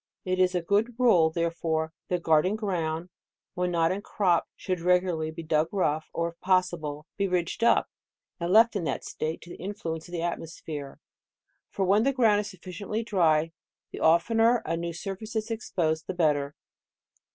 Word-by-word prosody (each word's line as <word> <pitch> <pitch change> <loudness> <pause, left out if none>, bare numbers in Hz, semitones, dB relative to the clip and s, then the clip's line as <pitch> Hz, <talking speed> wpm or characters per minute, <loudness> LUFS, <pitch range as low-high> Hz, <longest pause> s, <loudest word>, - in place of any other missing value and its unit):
It 185 0 0
is 185 0 +3
a 175 - 0
good 210 +6 +1
rule, 185 -10 +5
therefore, 165 -1 -1
that 180 -1 -2
garden 160 +5 +3
ground, 175 -5 -2 0.4
when 180 0 -1
not 165 -1 +2
in 195 +2 -2
crop, 185 -4 +1
should 185 -2 -3
re 180 +1 +4
gularly 160 -4 -3
be 165 +1 -7
dug 155 0 +1
rough, 155 -6 0
or 170 0 -1
if 170 - -17
possible, 175 -5 0
be 200 -1 +1
ridged 180 +3 -1
up, 235 - +4 0.5
and 170 +1 -2
left 225 +2 +6
in 195 - -1
that 135 - -2
state 155 +1 -4
to 175 - -12
the - - -9
influence 170 -4 -5
of 175 - -13
£00 - - -2
DECEMBER* 170 +1 0
Hie 170 - 0
atmosphere; 150 -3 -8 0.7
for 195 - -1
when 200 +3 +4
the 275 +4 +2
ground 225 -5 +4
is 210 - -3
suf 185 -3 -14
ficiently 200 +5 -4
dry, 165 -6 +2 0.4
the - - -7
oftener 225 +8 +4
a 165 - -1
new 170 0 -3
surface 195 +6 -6
is 220 +1 -2
ex 225 0 -5
posed, 160 -3 0
the 190 - -4
better. 150 -4 +1
175 Hz, 195 wpm, -27 LUFS, 160-200 Hz, 0.7 s, left